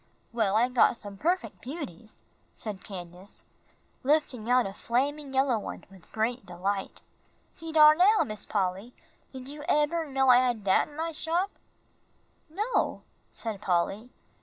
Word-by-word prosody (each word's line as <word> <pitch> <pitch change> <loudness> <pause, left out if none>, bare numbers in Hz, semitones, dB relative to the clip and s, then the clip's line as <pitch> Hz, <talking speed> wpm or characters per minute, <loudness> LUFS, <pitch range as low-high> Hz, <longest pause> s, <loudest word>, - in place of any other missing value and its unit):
"Well, 215 -4 +1
I 235 +3 +4
got 250 -1 +3
some 205 -2 -8
perfec' 350 - -1
beauties," 235 - -8 0.3
said 210 -4 -7
Candace, 180 0 -10 0.6
lifting 265 -5 0
out 250 0 +4
a 195 - -5
flaming 275 +6 -1
yellow 265 -3 +2
one - - -7
with 190 -3 -18
great 235 +3 -1
delight. 190 +3 -3 0.5
"See 325 0 -7
dar 305 -1 +8
now, 385 +7 +5
Miss 215 -1 -5
Polly, 195 +4 -2 0.4
did 260 -1 -9
you 295 +1 -8
eber 310 +2 +2
know 270 -1 +2
I 245 - +9
had 245 -4 +1
dat 190 -1 +3
in 295 - -15
my 330 +1 -2
shop?" 340 +5 -1 1.0
"No," 420 +10 -1 0.3
said 215 -3 -6
Polly. 195 +5 0
245 Hz, 145 wpm, -28 LUFS, 205-300 Hz, 1.0 s, I